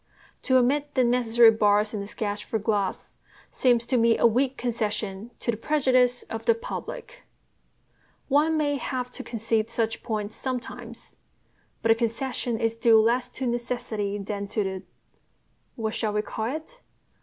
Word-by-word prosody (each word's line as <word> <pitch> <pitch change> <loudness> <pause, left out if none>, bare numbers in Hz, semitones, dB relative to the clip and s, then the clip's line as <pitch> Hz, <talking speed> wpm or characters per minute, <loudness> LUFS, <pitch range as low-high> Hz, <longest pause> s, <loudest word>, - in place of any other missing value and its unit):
To 260 -1 +3
omit 285 +4 +1
the 260 - +4
necessary 240 -1 +5
bars 210 0 +2
in 210 - -3
a 200 - -6
sketch 205 0 -3
for 225 - -2
glass 205 -3 -2 0.3
seems 240 -2 +2
to 250 +1 +1
me 230 -1 +4
a - - +3
weak 255 +3 +2
concession 215 -3 -2
to 235 - +1
the 220 - -5
prejudice 255 -2 +2
of 225 - -7
the 465 - +5
public. - - -7 1.1
One 300 +3 +3
may 290 -2 +1
have 250 -1 -3
to - - -7
concede 225 -1 -1
such 230 -1 -1
points 215 -3 -3
sometimes; 255 -2 -6 0.7
but 230 - +1
the - - +9
concession 235 0 -2
is 225 -1 +1
due 230 -1 +5
less 240 +3 +2
to 260 - -5
necessity 235 -4 -2
than 200 0 -4
to 210 +1 -1
the 190 -1 -4 0.9
what 220 -2 -3
shall 215 -2 -1
we 210 0 0
call 220 +1 -4
it? 410 +11 -9
235 Hz, 160 wpm, -26 LUFS, 215-255 Hz, 1.1 s, the